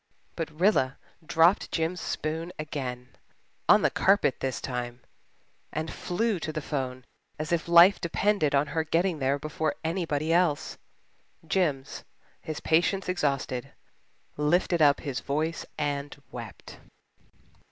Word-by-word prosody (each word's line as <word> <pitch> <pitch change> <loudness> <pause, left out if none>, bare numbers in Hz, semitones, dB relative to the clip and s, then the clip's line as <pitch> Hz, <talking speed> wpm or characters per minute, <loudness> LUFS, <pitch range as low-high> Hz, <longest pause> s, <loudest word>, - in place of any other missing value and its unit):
But 165 -2 -3
Rilla 170 -9 +3 0.3
dropped 170 +3 +3
Jims' 165 +2 -1
spoon 160 +3 -3
again 130 -5 -5 0.6
on - - +7
the - - +3
carpet 195 -8 +3
this 130 -2 -2
time 125 -1 -5 0.7
and 160 +1 -3
flew 210 +2 -1
to 155 - -4
the 155 - -3
'phone 130 -4 -4 0.3
as 155 +1 -4
if 170 -2 0
life 170 +4 +7
depended 170 -3 +1
on 140 +1 +3
her 160 -1 +1
getting 165 +1 0
there 135 +1 +1
before 155 +1 -2
anybody 160 -2 -1
else. 170 -4 +1 0.7
Jims, 155 -7 -1 0.4
his 155 -2 -5
patience 175 +4 +2
exhausted, 140 -6 -1 0.6
lifted 170 +3 +2
up 145 -2 +5
his 140 -5 -3
voice 155 +4 -2
and 145 -1 -3
wept. 115 -5 -9
155 Hz, 125 wpm, -27 LUFS, 140-170 Hz, 0.7 s, on